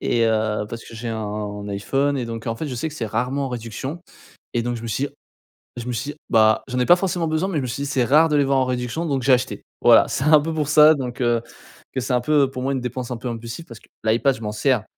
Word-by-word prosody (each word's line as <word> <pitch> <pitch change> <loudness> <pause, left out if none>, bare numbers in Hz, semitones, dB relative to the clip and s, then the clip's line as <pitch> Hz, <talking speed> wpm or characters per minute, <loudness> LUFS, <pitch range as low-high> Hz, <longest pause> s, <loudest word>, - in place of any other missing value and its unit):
Et 115 -1 +1
heu, 110 -1 0
parce 115 0 -7
que - - -12
j'ai 115 +1 -5
un 105 -2 -4
iPhone 135 +8 0
et 125 - -2
donc, 115 0 -6
en 115 - -1
fait, 160 - -4
je 130 - -4
sais 125 +6 -2
que 150 - -10
c'est 115 -7 -3
rarement 125 +6 -1
en - - -4
réduction 125 +6 -5 0.5
et 120 - +1
donc 120 0 -2
je 115 - -8
me - - -5
suis 130 +5 -1
dit - - -11 0.7
je 120 0 -6
me 125 - -2
suis 120 +6 -3
dit 150 - -14
bah: 110 -1 +4
«J'en 125 - -4
ai 125 - +2
pas 175 - +7
forcément 175 -3 -1
besoin» 160 +4 0
mais 190 - -4
je - - 0
me 130 - -3
suis 135 +4 -4
dit: 140 - -3
«C'est 135 -3 +1
rare 150 +7 +5
de 150 - 0
les 145 - +4
voir 135 0 +2
en 130 - +3
réduction». 125 +6 -2
Donc 140 -5 -1
j'ai 135 - +3
acheté. 125 0 +1 0.2
Voilà, - - +7
c'est 135 - -1
un 155 -1 +6
peu 160 +2 -3
pour 150 -2 -1
ça 150 +1 +7
donc, 125 -2 -5
heu, 120 -1 +2 0.5
que 130 - -1
c'est 130 - -3
un 125 - +3
peu 145 0 +3
pour 130 - -5
moi 135 +2 0
une 130 - -2
dépense 125 0 -4
un 125 - -1
peu 120 +2 -5
impulsive 115 +6 -6
parce 115 -2 -11
que - - -23 0.2
l'iPad 115 +5 +2
je 115 - -12
m'en 105 -1 -3
sers. 120 +1 +1
125 Hz, 295 wpm, -22 LUFS, 115-140 Hz, 0.7 s, pas